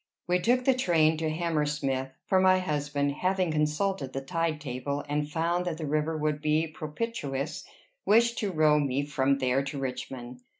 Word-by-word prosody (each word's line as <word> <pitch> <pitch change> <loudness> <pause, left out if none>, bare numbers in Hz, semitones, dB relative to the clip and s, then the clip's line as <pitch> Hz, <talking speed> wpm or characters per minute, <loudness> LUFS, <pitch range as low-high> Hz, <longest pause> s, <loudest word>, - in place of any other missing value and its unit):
We 180 +1 +2
took 245 +6 +2
the 265 - +5
train 165 -10 +3
to 160 0 -1
Hammersmith; 150 -5 -1 0.2
for 190 - +3
my 185 0 +5
husband, 145 -5 -1
having 185 +3 0
consulted 150 0 0
the 135 - -3
tide 165 +2 -1
table, 140 +1 -4
and 145 0 -1
found 170 +3 0
that 170 -3 -2
the 160 - -4
river 155 +2 0
would 150 -1 -1
be 155 +1 +2
propitious, 155 - -4 0.4
wished 235 +2 +4
to 205 -3 -1
row 155 -2 +4
me 140 0 0
from 140 -1 +1
there 130 0 +1
to 140 +1 -5
Richmond. 125 -2 -5
150 Hz, 170 wpm, -28 LUFS, 140-175 Hz, 0.4 s, the